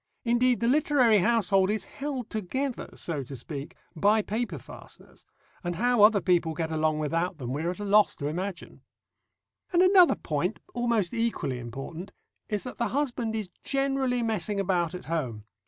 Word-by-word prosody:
Indeed, 240 +1 +2
the 235 - +2
literary 255 -5 +4
household 195 -2 +3
is 210 -2 -1
held 270 -3 -5
together, 245 +6 -3
so 160 -5 -3
to 135 +1 -8
speak, 140 +3 -7 0.2
by 210 +6 +3
paper 210 -6 -3
fasteners, 125 - -13 0.4
and 175 0 -2
how 245 +4 +2
other 210 0 +7
people 170 -3 +1
get 160 0 -2
along 155 -1 +1
without 165 +3 -1
them 125 -3 -4
we 145 - -2
are 170 - -1
at 180 - -5
a 205 - -4
loss 210 +1 +4
to 140 - -6
imagine. 175 +4 -5 0.9
And 355 0 +4
another 370 -1 +6
point, - - -2 0.2
almost 235 -6 0
equally 230 - -1
important, 135 - -7 0.4
is 210 -2 -2
that 250 - -8
the 235 - +1
husband 245 -5 -1
is 210 -4 -4
generally 270 -3 0
messing 210 -2 -1
about 180 -3 0
at 180 - -8
home. 130 -10 -3
205 Hz, 170 wpm, -27 LUFS, 165-240 Hz, 0.9 s, other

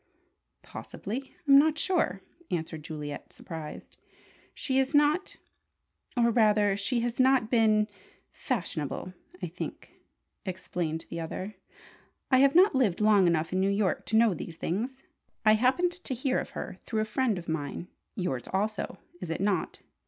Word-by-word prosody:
"Possibly. 255 +7 -7
I'm 275 0 +9
not 310 +1 +3
sure," 310 - +1 0.3
answered 160 -2 -3
Juliet, 150 -2 -6
surprised. 160 -3 -9 0.6
"She 265 -1 0
is 265 +2 +1
not 295 +6 +3 0.8
or 235 -1 +4
rather 210 -3 +4
she 230 +4 0
has 240 +1 -2
not 260 -3 +4
been 215 -3 +4 0.4
fashionable, 180 - -3 0.3
I - - +1
think," - - -8 0.4
explained 175 -4 -3
the 170 - -4
other. 185 +5 -5 0.8
"I 260 - +6
have 275 +2 +5
not 370 +2 +7
lived 245 -10 +2
long 210 -3 +5
enough 165 0 +1
in 185 - +1
New 195 +1 +2
York 200 -1 0
to 220 - +2
know 225 -3 +5
these 165 0 -7
things. 245 +12 -3 0.4
I 215 - +7
happened 260 +11 +3
to 345 -7 -4
hear 260 +1 0
of - - -5
her - - -6
through 220 -1 -2
a - - 0
friend 220 -1 0
of 170 - -7
mine 160 +1 -3 0.3
(yours 135 - -2
also, 210 +2 -1 0.2
is 180 - -6
it 165 - -2
not?) 195 -2 -1
215 Hz, 150 wpm, -29 LUFS, 180-260 Hz, 0.8 s, I'm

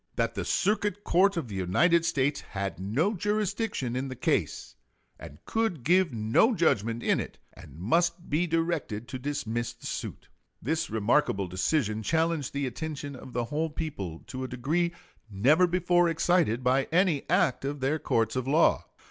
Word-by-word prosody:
That - - 0
the - - -3
Circuit 205 0 0
Court 195 +2 +3
of 155 -7 -2
the 105 - -8
United 165 - +2
States 140 -2 0
had 95 -1 -5
no 130 - 0
jurisdiction 205 - -1
in 130 +2 -2
the 130 - -6
case - - -1 0.4
and 70 - -10
could 220 - -1
give 180 +3 +3
no 115 - +2
judgment 115 - +1
in - - +2
it, - - -6 0.2
and 70 - -14
must 170 - 0
be 165 +4 +1
directed 165 -9 -1
to 130 0 -5
dismiss 120 -4 -3
the - - -16
suit. - - -5 0.3
This 155 +7 -2
remarkable 110 -1 +1
decision 110 - 0
challenged 160 +2 0
the 140 0 -2
attention 145 +2 -5
of 130 0 -11
the 120 0 -1
whole 160 +2 0
people 100 - -5
to 130 0 -6
a - - -3
degree 155 +8 -1 0.4
never 140 - +4
before 175 0 +2
excited 160 -7 +1
by 130 +2 +2
any 170 -4 +2
act 130 - +2
of 140 +1 -3
their 135 +4 0
courts 115 -4 0
of 130 0 -2
law. 155 +4 +3
145 Hz, 165 wpm, -28 LUFS, 120-170 Hz, 0.4 s, never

